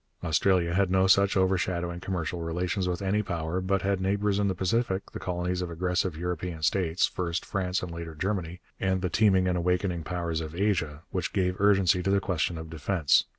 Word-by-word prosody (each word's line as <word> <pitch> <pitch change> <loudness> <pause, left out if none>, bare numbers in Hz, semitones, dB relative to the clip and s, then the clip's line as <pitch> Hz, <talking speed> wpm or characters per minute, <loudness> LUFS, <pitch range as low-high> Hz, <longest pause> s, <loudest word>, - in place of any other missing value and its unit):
Australia 85 +1 +2
had 95 0 +2
no 95 0 +3
such 100 +1 +4
overshadowing 90 -2 0
commercial 90 -2 -3
relations 90 +3 -1
with 90 +2 -3
any 100 +2 +1
power, 90 -2 -2
but 95 0 0
had 100 -1 0
neighbours 100 +1 +1
in 100 - +2
the 95 - 0
Pacific 95 +1 -1
the - - -6
colonies 90 0 -2
of 90 - -3
aggressive 90 0 -1
European 90 -1 -4
states, 85 +1 +2
first 85 -1 -3
France 90 -2 -1
and 90 - -5
later 85 -1 -7
Germany, 90 -1 -3 0.2
and 95 -1 0
the 90 - -1
teeming 95 -4 +4
and 90 -1 +1
awakening 90 -1 0
powers 85 -1 -2
of 80 0 -6
Asia 85 -6 0
which 90 -3 -2
gave 90 -2 +1
urgency 95 -2 +4
to 95 - -1
the 100 0 +4
question 90 -2 -1
of 80 0 -7
defence. 80 0 +2
90 Hz, 195 wpm, -28 LUFS, 85-95 Hz, 0.2 s, such